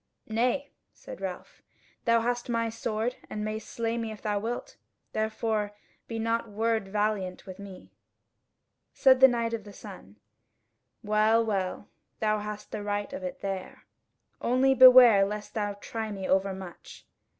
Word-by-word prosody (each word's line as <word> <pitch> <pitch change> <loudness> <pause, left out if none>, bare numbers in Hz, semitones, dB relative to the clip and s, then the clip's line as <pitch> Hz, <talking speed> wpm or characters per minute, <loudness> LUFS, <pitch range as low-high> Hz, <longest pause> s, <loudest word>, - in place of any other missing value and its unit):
"Nay," 250 +6 0 0.2
said - - -11
Ralph, - - -7 0.4
"thou 230 0 +4
hast 245 +1 -2
my 230 -1 0
sword, 225 +2 -2
and 210 0 -4
mayst 215 0 -5
slay 230 0 -2
me 225 -1 -3
if 215 - -9
thou 210 -2 0
wilt; 230 +4 -5 0.4
therefore 215 -1 -1 0.3
be 230 - -4
not 230 0 -1
word 220 0 0
valiant 205 -3 -1
with 190 0 -10
me." 195 -2 -11 1.0
Said 260 -2 +5
the 265 - +10
Knight 235 -2 -1
of 225 -2 -3
the 205 - -11
Sun: - - -12 0.9
"Well, 215 +2 +3
well, 195 -2 -2 0.3
thou 215 -1 +1
hast 210 0 -7
the 210 - -4
right 205 +3 -3
of 280 - -5
it 275 0 -6
there. 195 -1 -5 0.6
Only 255 +2 +3
beware 250 -5 +9
lest 210 +1 -4
thou 205 -2 -1
try 220 +1 -5
me 195 -2 -5
overmuch. 190 -2 -3
220 Hz, 150 wpm, -28 LUFS, 205-230 Hz, 1.0 s, the